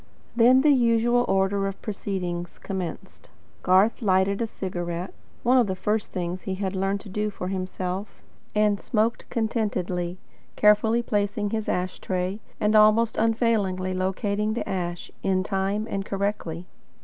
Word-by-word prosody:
Then 245 +3 +6
the 300 +1 +5
usual 240 -1 +3
order 195 +1 +1
of 195 - -5
proceedings 180 -4 -4
commenced. 185 -4 -6 0.3
Garth 190 +7 +3
lighted 195 0 +2
a 230 - 0
cigarette 175 -3 -4 0.3
one 255 +2 +5
of 240 - +3
the 190 - -1
first 210 +3 -1
things 180 0 -3
he 190 - -3
had 190 0 -3
learned 195 +1 0
to - - -12
do 210 +2 -1
for 185 -3 -5
himself 185 +1 -4 0.4
and 210 -1 +3
smoked 225 +1 -1
contentedly, 190 -6 -1 0.4
carefully 220 +3 +4
placing 205 -1 -1
his 220 -1 -2
ash 180 0 -2
tray, 185 +2 -2 0.2
and 210 0 +2
almost 215 +2 +5
unfailingly 220 -5 +1
locating 200 +3 -1
the - - -3
ash, 175 -2 -3
in 185 -1 +1
time 195 +2 -1
and 195 -3 -2
correctly. 195 -4 -3
200 Hz, 145 wpm, -25 LUFS, 185-215 Hz, 0.4 s, Then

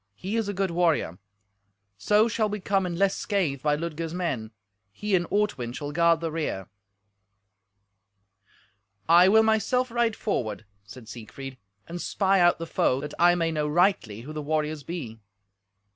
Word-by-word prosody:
He 195 - -4
is 225 -2 0
a - - -2
good 190 -1 -1
warrior. 165 - +1 0.8
So 210 - +3
shall 215 -1 0
we 210 +1 -4
come 195 -1 0
in 175 - -4
less 195 +1 +2
scathe 170 -10 -1
by 150 0 +2
Ludger's 165 +1 -4
men. 135 -12 -2 0.4
He 205 - -4
and 175 -2 0
Ortwin 200 - -1
shall 145 +2 -5
guard 170 +1 +3
the 165 -1 -2
rear." 150 - -3 2.4
"I 175 +3 +7
will 220 +3 +6
myself 230 +3 +1
ride 235 -1 +1
forward," 110 - -3 0.2
said 110 +4 -13
Siegfried, 125 +4 -9 0.3
"and 175 +1 -6
spy 195 -1 +1
out 175 0 +4
the 165 - -5
foe, 130 -5 +1
that 150 0 -6
I 175 0 +5
may 165 -1 0
know 150 -1 -1
rightly 150 - +1
who 150 +6 -9
the 155 - -4
warriors 155 0 -2
be." 135 -8 -7
170 Hz, 160 wpm, -26 LUFS, 145-195 Hz, 2.4 s, I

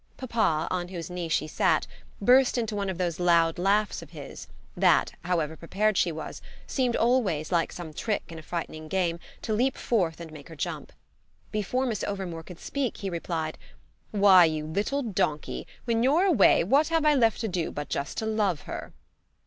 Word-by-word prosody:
Papa, 210 -11 0
on 180 -1 -1
whose 175 -2 -6
knee 175 -2 -4
she 155 - +1
sat, 155 - +2 0.3
burst 250 +5 +5
into 225 -3 -1
one 200 -1 -1
of 185 - -3
those 175 -3 -2
loud 170 -2 +3
laughs 205 +3 +1
of - - -12
his - - -9 0.3
that, - - +4
however 165 -3 0
prepared 205 +6 0
she 175 - +2
was, 160 0 -7 0.2
seemed 250 -3 0
always, 220 -11 +1
like 170 -2 +1
some 165 -3 -8
trick 210 +6 -2
in 165 -1 -8
a - - -9
frightening 155 -1 -5
game, 170 -1 0 0.2
to 220 - -1
leap 255 +5 +1
forth 175 -9 0
and 165 -2 -8
make 150 -1 -11
her 165 - -10
jump. 145 - -4 0.6
Before 220 +5 -1
Miss 225 -5 -2
Overmore 190 -5 -4
could 175 +1 -12
speak 275 -4 -3
he 195 -2 -4
replied: 165 -2 -3 0.5
"Why, 195 -4 +7
you 155 -1 -1
little 205 - -1
donkey, 170 -9 -2 0.2
when 230 -2 +1
you're 290 +9 +4
away 305 - +5
what 275 - +3
have 325 -2 +1
I 300 - +6
left 230 -6 +3
to 225 - -1
do 180 -4 -2
but 145 0 -5
just 140 - -3
to 220 - -1
love 210 -7 0
her?" - - -7
185 Hz, 190 wpm, -27 LUFS, 165-225 Hz, 0.6 s, Why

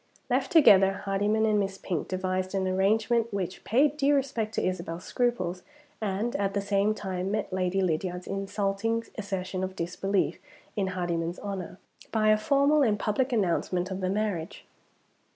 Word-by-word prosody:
Left - - +1
together, 195 - +6
Hardyman 205 +3 +1
and 215 -1 +3
Miss 195 -1 -2
Pink 175 -5 -3
devised 185 +1 -2
an 190 -1 0
arrangement 220 +5 +2
which 190 -2 -4
paid 285 +6 +2
due 285 0 +3
respect 235 -6 -1
to - - 0
Isabel's 170 -1 -4
scruples, 210 -8 -1 0.4
and 215 +5 -1
at 200 0 -1
the - - +2
same 200 +1 +1
time 190 -2 -3
met 210 -2 -2
Lady 185 +1 0
Lydiard's 180 +1 -1
insulting 195 +3 -1 0.2
assertion 190 -2 -3
of 190 0 -4
disbelief 180 +3 -1 0.4
in 200 -3 0
Hardyman's 170 -1 -2
honor, 195 -3 -5 0.3
by 215 -1 +2
a 215 - +6
formal 280 +5 +3
and 220 -6 +3
public 235 +6 0
announcement 185 -3 0
of 190 0 -4
the 185 - 0
marriage. 195 -5 -2
195 Hz, 155 wpm, -28 LUFS, 185-215 Hz, 0.4 s, together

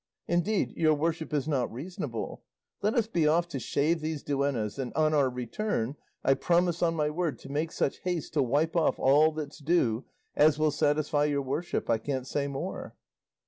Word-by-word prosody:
Indeed, 175 +5 0
your 155 -2 +3
worship 160 +1 -2
is 145 -1 0
not 135 -6 0
reasonable. 135 -3 -5 0.4
Let 210 +2 +1
us 235 - +3
be 170 -8 +1
off 170 +3 +3
to 140 - -4
shave 155 +6 +1
these 155 -1 -3
duennas; 140 -5 -1
and 130 -2 -3
on 155 0 +3
our 140 -3 +3
return 125 - -2 0.3
I 135 - +5
promise 175 +4 +1
on 165 -1 +2
my 150 -1 0
word 160 -5 -1
to 135 - -11
make 155 +3 -1
such - - -1
haste 175 -5 -3
to 150 - +3
wipe 145 +6 +1
off 165 -2 +2
all 150 +4 +5
that's 150 -2 -6
due 140 -7 +1 0.3
as 150 0 +5
will 155 0 +2
satisfy 150 0 +1
your 145 -1 0
worship; 145 +6 -2
I 115 - +2
can't 130 +1 -3
say 140 +1 -1
more." 140 -1 -5
150 Hz, 185 wpm, -29 LUFS, 140-165 Hz, 0.4 s, I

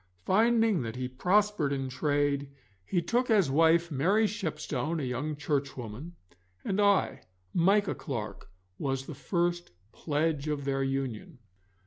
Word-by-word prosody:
Finding 225 -2 +3
that 115 -1 -5
he 125 0 -3
prospered 180 +3 +1
in 135 -1 -2
trade, 145 +1 0 0.3
he 175 - -1
took 245 +1 0
as 200 -11 +4
wife 165 +3 +4
Mary 190 +11 +3
Shepstone, 160 - -2
a - - -3
young 135 +5 -2
Churchwoman, 140 0 -4 0.5
and 200 +1 +1
I, 200 -1 +2 0.3
Micah 195 +4 +3
Clarke, 115 -8 -6 0.3
was 135 -1 -2
the 155 - -7
first 175 +3 -1 0.2
pledge 155 -1 -1
of 145 -2 -2
their 135 -1 0
union. 135 - -3
150 Hz, 130 wpm, -29 LUFS, 135-185 Hz, 0.5 s, as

